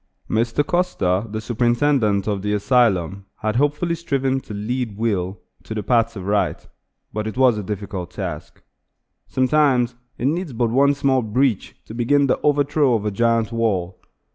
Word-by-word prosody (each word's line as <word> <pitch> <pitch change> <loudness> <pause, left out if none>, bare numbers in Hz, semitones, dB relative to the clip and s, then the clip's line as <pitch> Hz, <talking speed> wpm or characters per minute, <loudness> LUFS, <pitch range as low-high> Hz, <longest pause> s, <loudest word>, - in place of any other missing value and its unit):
Mr. 115 +6 0
Custer, 115 - 0
the 110 +1 -4
superintendent 120 -2 +1
of 100 -2 -1
the 105 +1 -1
asylum, 100 -4 +1 0.2
had 110 +1 0
hopefully 150 +5 +1
striven 135 -5 -1
to 125 - -13
lead 110 +1 -3
Will 100 -4 -1 0.2
to 110 - -7
the 105 - -3
paths 115 +1 +2
of 95 -3 -7
right; 100 +1 0 0.5
but 110 0 -3
it 110 - -6
was 130 -3 +5
a - - -5
difficult 100 -3 -5
task. 85 -7 -7 0.6
Sometimes 130 -2 +2 0.2
it 120 - -3
needs 160 +1 -1
but 115 -1 0
one 140 +3 +4
small 135 -2 +2
breach 115 0 0
to - - -10
begin 140 +5 +2
the 135 - +1
overthrow 145 -2 +2
of 105 -2 -2
a 105 - 0
giant 115 +1 +1
wall. 95 -6 -1
115 Hz, 165 wpm, -21 LUFS, 105-135 Hz, 0.6 s, was